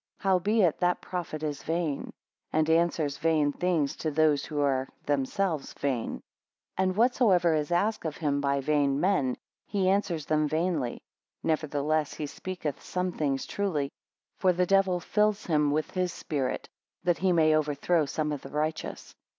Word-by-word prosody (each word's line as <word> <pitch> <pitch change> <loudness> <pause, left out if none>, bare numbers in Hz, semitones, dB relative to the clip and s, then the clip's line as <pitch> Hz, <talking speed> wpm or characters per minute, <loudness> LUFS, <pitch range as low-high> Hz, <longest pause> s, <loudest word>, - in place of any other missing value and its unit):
Howbeit 195 -1 +2
that 180 0 +2
prophet 170 -4 -5
is 150 -2 -3
vain, 165 -3 -2 0.4
and 155 0 +2
answers 160 -4 +1
vain 155 -2 +2
things 170 -5 0
to 160 - -2
those 155 -1 +3
who 150 -2 -4
are 135 -2 +1 0.2
themselves 145 +4 -1
vain. 130 -5 -2
6 - - -12 0.6
And 185 -1 +2
whatsoever 210 -7 +4
is 150 0 -1
asked 205 +5 +1
of 155 -2 -4
him 145 -3 0
by 140 0 +1
vain 140 -1 +2
men, 145 -9 +1 0.3
he 195 -3 +1
answers 180 -6 0
them 155 -1 +2
vainly; 155 -5 -1 0.4
nevertheless 155 -1 0
he 150 - -3
speaketh 160 -1 -5
some 180 0 -2
things 140 -5 -1
truly. 155 -9 -1 0.5
For 185 - +4
the 180 +1 +1
Devil 195 -1 +3
fills 210 +3 +1
him 150 -3 +2
with 150 +2 -1
his 185 -1 -1
spirit, 140 -6 -3 0.4
that 175 -2 +1
he 185 0 +2
may 155 -2 +4
overthrow 155 +1 +1
some 150 +2 -1
of 145 -2 -3
the - - -9
righteous. 155 +1 -3
155 Hz, 160 wpm, -28 LUFS, 145-180 Hz, 0.6 s, whatsoever